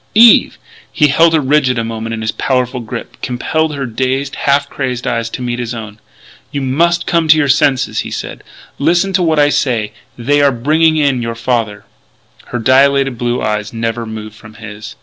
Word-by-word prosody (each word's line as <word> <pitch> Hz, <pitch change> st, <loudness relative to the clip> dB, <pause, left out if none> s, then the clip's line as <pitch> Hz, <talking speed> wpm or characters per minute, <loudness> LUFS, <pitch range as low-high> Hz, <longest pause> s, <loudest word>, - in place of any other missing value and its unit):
"Eve!" 230 Hz, +1 st, +6 dB, 0.3 s
He 150 Hz, -3 st, +3 dB
held 165 Hz, +4 st, +4 dB
her -, -, +3 dB
rigid 135 Hz, -2 st, +1 dB
a 115 Hz, -, 0 dB
moment 115 Hz, 0 st, -4 dB
in 110 Hz, -, -6 dB
his 110 Hz, -, -1 dB
powerful 125 Hz, -1 st, -1 dB
grip, 115 Hz, 0 st, -8 dB
compelled 150 Hz, +5 st, -1 dB
her 140 Hz, -1 st, -3 dB
dazed, 130 Hz, +3 st, -2 dB
half 140 Hz, 0 st, +1 dB
crazed 125 Hz, -3 st, -4 dB
eyes 115 Hz, 0 st, -1 dB
to 125 Hz, -, -6 dB
meet 120 Hz, 0 st, -3 dB
his 120 Hz, 0 st, -4 dB
own: 110 Hz, -2 st, -8 dB, 0.5 s
"You 140 Hz, -, -3 dB
must 170 Hz, +6 st, +1 dB
come 170 Hz, -2 st, +1 dB
to 155 Hz, 0 st, +6 dB
your 150 Hz, -2 st, +2 dB
senses," 135 Hz, -1 st, +2 dB
he -, -, -4 dB
said. -, -, -6 dB, 0.4 s
"Listen 175 Hz, +6 st, +1 dB
to 185 Hz, -, +2 dB
what 160 Hz, -3 st, +1 dB
I 145 Hz, 0 st, +4 dB
say: 120 Hz, -7 st, 0 dB, 0.3 s
they 145 Hz, +5 st, +1 dB
are 140 Hz, -1 st, +4 dB
bringing 155 Hz, +6 st, +2 dB
in 140 Hz, -4 st, +1 dB
your 115 Hz, 0 st, -4 dB
father." 115 Hz, -4 st, -2 dB, 0.6 s
Her 125 Hz, -, -5 dB
dilated 135 Hz, +1 st, +3 dB
blue 120 Hz, 0 st, -1 dB
eyes 105 Hz, 0 st, -2 dB
never 115 Hz, 0 st, -3 dB
moved 110 Hz, -1 st, -7 dB
from 110 Hz, 0 st, -15 dB
his. 105 Hz, -1 st, -9 dB
130 Hz, 190 wpm, -15 LUFS, 115-145 Hz, 0.6 s, Eve